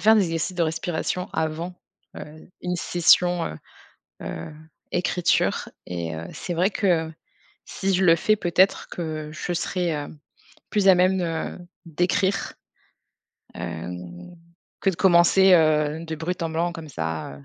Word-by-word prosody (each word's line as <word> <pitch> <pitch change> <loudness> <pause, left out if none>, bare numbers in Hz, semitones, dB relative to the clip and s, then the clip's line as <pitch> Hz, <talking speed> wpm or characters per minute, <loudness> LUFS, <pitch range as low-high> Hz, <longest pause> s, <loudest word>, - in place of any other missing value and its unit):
faire 220 +1 +6
des 205 - +4
exercices 165 +2 -2
de 170 - +2
respiration 165 +2 -2
avant, 160 +3 -2 0.4
heu, 155 +1 -11
une 180 0 -2
session, 175 0 +3
heu 80 - -6 0.7
heu, 80 - -6 0.4
écriture. 180 0 +1 0.2
Et, 85 -2 -4
heu, 80 - -6
c'est 175 - -4
vrai 180 +4 +2
que, 170 -6 +1 0.6
si 195 -1 -1
je 185 +1 +2
le 165 -2 +6
fais 215 +6 +2
peut-être 185 +1 +2
que 155 -3 -5
je 160 +3 -4
serai, 175 +1 -1
hem, 150 0 -5 0.5
plus 205 -2 +2
à 190 - +8
même 180 -3 0 0.3
d'écrire, 180 +4 0 1.0
heu, 85 +1 -5 0.9
que 195 - +4
de 180 - -7
commencer, 190 +1 +5
heu, 155 -1 +2
de 160 -1 -4
brut 170 +3 -3
en 165 - -1
blanc 170 +2 -1
comme 165 -2 -9
ça, 80 - -4
heu, 70 - -15
170 Hz, 145 wpm, -24 LUFS, 155-180 Hz, 1.0 s, à